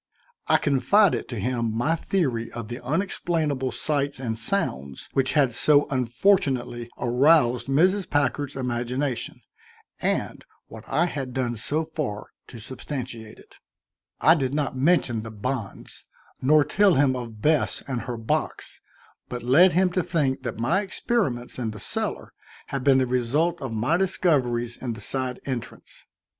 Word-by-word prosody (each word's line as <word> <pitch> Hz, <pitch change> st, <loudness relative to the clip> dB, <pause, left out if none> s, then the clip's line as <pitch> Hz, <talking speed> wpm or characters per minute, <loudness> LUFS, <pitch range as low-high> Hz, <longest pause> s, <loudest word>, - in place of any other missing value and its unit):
I -, -, +5 dB
confided 175 Hz, +8 st, +2 dB
to 120 Hz, -, -5 dB
him 115 Hz, +1 st, -1 dB
my 145 Hz, +8 st, +1 dB
theory 135 Hz, -10 st, -1 dB
of 115 Hz, -2 st, -6 dB
the 120 Hz, +1 st, -7 dB
unexplainable 150 Hz, -3 st, -1 dB
sights 140 Hz, -2 st, -1 dB
and 115 Hz, -4 st, -2 dB
sounds 70 Hz, -, -2 dB
which 135 Hz, -1 st, +1 dB
had 140 Hz, -5 st, +3 dB
so 145 Hz, +4 st, +4 dB
unfortunately 125 Hz, -, +1 dB
aroused 125 Hz, -1 st, +3 dB
Mrs. 185 Hz, +8 st, +2 dB
Packard's 145 Hz, -1 st, 0 dB
imagination, 125 Hz, 0 st, -2 dB, 0.6 s
and -, -, -1 dB, 0.2 s
what 110 Hz, 0 st, -12 dB
I 170 Hz, -, +2 dB
had 135 Hz, -7 st, -5 dB
done 125 Hz, -2 st, -1 dB
so 150 Hz, +8 st, -2 dB
far 145 Hz, -10 st, -4 dB, 0.2 s
to 120 Hz, -, -11 dB
substantiate 120 Hz, -2 st, -7 dB
it. -, -, -19 dB, 0.6 s
I 160 Hz, -, +6 dB
did 135 Hz, -4 st, -1 dB
not 145 Hz, -3 st, -1 dB
mention 130 Hz, -5 st, +2 dB
the 115 Hz, -, -7 dB
bonds, 110 Hz, 0 st, -5 dB, 0.4 s
nor 150 Hz, +3 st, +5 dB
tell 200 Hz, +2 st, +3 dB
him 135 Hz, -1 st, +3 dB
of 115 Hz, -4 st, -7 dB
Bess 150 Hz, +7 st, +1 dB
and 130 Hz, -4 st, -2 dB
her 125 Hz, -1 st, -5 dB
box, 110 Hz, 0 st, -3 dB, 0.5 s
but 125 Hz, -1 st, -5 dB
led 165 Hz, +10 st, +5 dB
him 185 Hz, +1 st, +3 dB
to 180 Hz, -, +1 dB
think 145 Hz, -6 st, 0 dB
that 120 Hz, -4 st, -5 dB
my 135 Hz, -, +1 dB
experiments 190 Hz, -, -2 dB
in 115 Hz, -3 st, -2 dB
the 105 Hz, -1 st, -8 dB
cellar -, -, -3 dB, 0.4 s
had 135 Hz, -2 st, -3 dB
been 135 Hz, -1 st, +5 dB
the 130 Hz, -, +3 dB
result 135 Hz, +8 st, 0 dB
of 135 Hz, -3 st, -4 dB
my 120 Hz, +10 st, +1 dB
discoveries 130 Hz, -11 st, +1 dB
in 120 Hz, -3 st, -4 dB
the 110 Hz, -, -9 dB
side 130 Hz, +2 st, -2 dB
entrance. 130 Hz, -4 st, -7 dB
130 Hz, 150 wpm, -25 LUFS, 120-155 Hz, 0.6 s, I